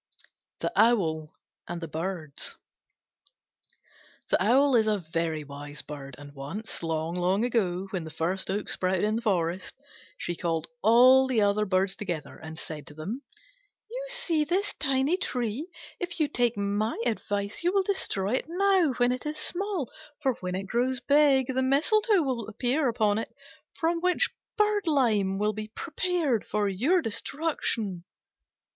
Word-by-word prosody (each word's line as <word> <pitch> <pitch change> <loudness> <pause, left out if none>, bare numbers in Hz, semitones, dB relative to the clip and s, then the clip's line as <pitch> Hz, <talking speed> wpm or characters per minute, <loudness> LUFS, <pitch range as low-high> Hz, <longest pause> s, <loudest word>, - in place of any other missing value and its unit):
THE - - 0
OWL 160 -10 +3 0.4
AND 175 0 -4
THE 165 - -5
BIRDS 160 -2 -4 1.7
The - - +3
Owl 265 +5 +4
is 220 -2 +4
a 215 -1 +3
very 165 -3 -2
wise 145 +1 -7
bird; 140 -3 -8
and 145 0 -11
once, 150 +11 -6
long 175 +5 0
ago, 190 -7 0
when 185 -4 -2
the 160 - -7
first 175 +5 -2
oak 205 +2 -1
sprouted 185 0 0
in 215 +1 +2
the - - -3
forest, 185 -4 0 0.4
she 175 - -3
called 165 -2 -1 0.2
all 255 +4 +7
the 235 -5 +2
other 205 +1 +2
Birds 190 +1 +1
together 175 -7 -4
and 160 0 -9
said 150 -3 -6
to 145 - -11
them, 200 - -5 0.7
"You - - -4
see 430 -12 +1
this 380 +6 0
tiny 275 +4 +1
tree? 250 - -2 0.3
If 350 -1 -4
you 305 - +3
take 240 -5 +1
my 205 +3 -1
advice, 205 -2 -2
you 350 - +3
will 390 0 +3
destroy 210 - -1
it 255 - 0
now 365 -3 +3
when 245 0 +2
it 255 +3 -3
is 305 0 -3
small: 370 - -2 0.3
for 270 -4 +1
when 180 0 -3
it 195 +1 -3
grows 250 +5 0
big, 275 -2 +4
the 260 - +1
mistletoe 355 - +3
will 250 -6 -2
appear 250 +6 0
upon 215 -2 +2
it, - - -4 0.5
from 335 +1 +1
which 360 +1 +2 0.3
birdlime 275 - +2
will 210 +1 +1
be 215 +1 -5
prepared 310 - -1
for 210 -1 0
your 275 - +2
destruction." 225 - -2
220 Hz, 155 wpm, -28 LUFS, 185-285 Hz, 1.7 s, all